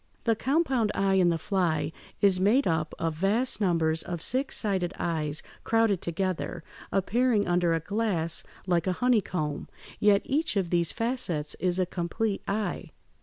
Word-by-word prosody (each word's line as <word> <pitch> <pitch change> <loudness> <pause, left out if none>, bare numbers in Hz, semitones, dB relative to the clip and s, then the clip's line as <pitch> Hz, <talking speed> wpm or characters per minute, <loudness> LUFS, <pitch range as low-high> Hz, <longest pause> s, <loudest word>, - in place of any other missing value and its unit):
The 225 -1 +2
compound 265 -4 +1
eye 195 0 +2
in 185 -2 +4
the 170 - +1
fly 160 -4 0 0.3
is 195 -2 +4
made 220 +9 +3
up 160 -2 -1
of 165 -1 -1
vast 210 +9 0
numbers 165 -4 +2
of 175 -1 -5
six 260 - +1
sided 190 -4 -1
eyes 155 -3 -1 0.2
crowded 225 -5 +2
together, 175 -1 -3 0.3
appearing 215 +2 +1
under 175 -1 +2
a - - 0
glass 180 -3 0 0.2
like 175 -1 +1
a 185 - +2
honeycomb; 180 -10 0 0.3
yet 205 -1 +4
each 305 +1 0
of 185 -4 -1
these 170 -1 +2
facets 225 - -2
is 180 -1 0
a 185 - +2
complete 190 +4 -2
eye. 210 +1 -2
185 Hz, 155 wpm, -27 LUFS, 170-220 Hz, 0.3 s, in